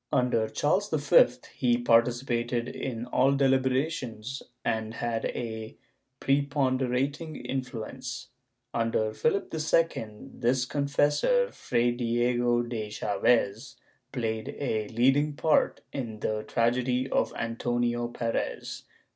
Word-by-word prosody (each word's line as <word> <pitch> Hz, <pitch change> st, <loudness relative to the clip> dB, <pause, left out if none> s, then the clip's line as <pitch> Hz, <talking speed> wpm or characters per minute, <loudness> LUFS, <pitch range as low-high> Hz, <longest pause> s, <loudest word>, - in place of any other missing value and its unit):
Under 120 Hz, -3 st, +2 dB
Charles 185 Hz, -, +1 dB
V 145 Hz, -3 st, +5 dB, 0.3 s
he 120 Hz, -2 st, +2 dB
participated 120 Hz, 0 st, +2 dB
in 120 Hz, -3 st, -4 dB
all 130 Hz, +2 st, +3 dB
deliberations 130 Hz, -2 st, 0 dB, 0.2 s
and 110 Hz, -1 st, -1 dB
had 115 Hz, -1 st, -2 dB
a 110 Hz, -2 st, -5 dB, 0.4 s
prepon 140 Hz, -1 st, +1 dB
derating 140 Hz, +5 st, -1 dB
influence.^ 125 Hz, -1 st, -5 dB, 0.5 s
Under 115 Hz, -2 st, 0 dB
Philip 195 Hz, -, 0 dB
II, 155 Hz, -11 st, -1 dB
his 125 Hz, +1 st, +2 dB
confessor 145 Hz, -, +2 dB
Fray 120 Hz, +1 st, 0 dB
Diego 120 Hz, 0 st, +1 dB
de 115 Hz, -3 st, -4 dB
Chaves, 105 Hz, +2 st, +1 dB, 0.4 s
played 110 Hz, -4 st, -3 dB
a 110 Hz, -6 st, -1 dB
leading 135 Hz, +7 st, +2 dB
part 155 Hz, +2 st, +2 dB
in 115 Hz, -6 st, -4 dB
the 110 Hz, 0 st, -2 dB
tragedy 125 Hz, +2 st, +1 dB
of -, -, +1 dB
Antonio 120 Hz, +1 st, -1 dB
Perez. 115 Hz, -1 st, -3 dB
120 Hz, 105 wpm, -28 LUFS, 115-135 Hz, 0.5 s, V